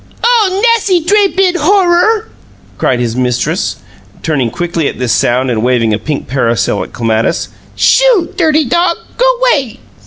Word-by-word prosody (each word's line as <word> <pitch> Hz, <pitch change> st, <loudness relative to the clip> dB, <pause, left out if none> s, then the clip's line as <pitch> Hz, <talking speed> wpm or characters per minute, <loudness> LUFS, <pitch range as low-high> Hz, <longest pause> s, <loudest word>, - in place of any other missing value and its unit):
"Oh, 430 Hz, -4 st, +2 dB
nassy 395 Hz, -6 st, +1 dB
dray 405 Hz, +3 st, +3 dB
bid 375 Hz, -2 st, 0 dB
Horror!" 390 Hz, +5 st, +2 dB, 0.5 s
cried 125 Hz, -, 0 dB
his 120 Hz, -2 st, -2 dB
mistress, 125 Hz, -1 st, -1 dB, 0.5 s
turning 135 Hz, -7 st, -1 dB
quickly 170 Hz, +2 st, -2 dB
at -, -, -5 dB
this 125 Hz, -3 st, -1 dB
sound 125 Hz, +1 st, +1 dB
and 110 Hz, -2 st, -1 dB
waving 120 Hz, -2 st, +1 dB
a 105 Hz, -, -1 dB
pink 145 Hz, +5 st, -4 dB
parasol 120 Hz, -3 st, -1 dB
at -, -, -11 dB
Clematis. 115 Hz, -1 st, -1 dB, 0.3 s
"Shoo! 485 Hz, -9 st, +2 dB
DIRTY 310 Hz, -1 st, +2 dB
dog! 340 Hz, +6 st, +1 dB, 0.2 s
Go -, -, +3 dB, 0.2 s
'way!" 270 Hz, -, 0 dB
260 Hz, 150 wpm, -12 LUFS, -, 0.5 s, dray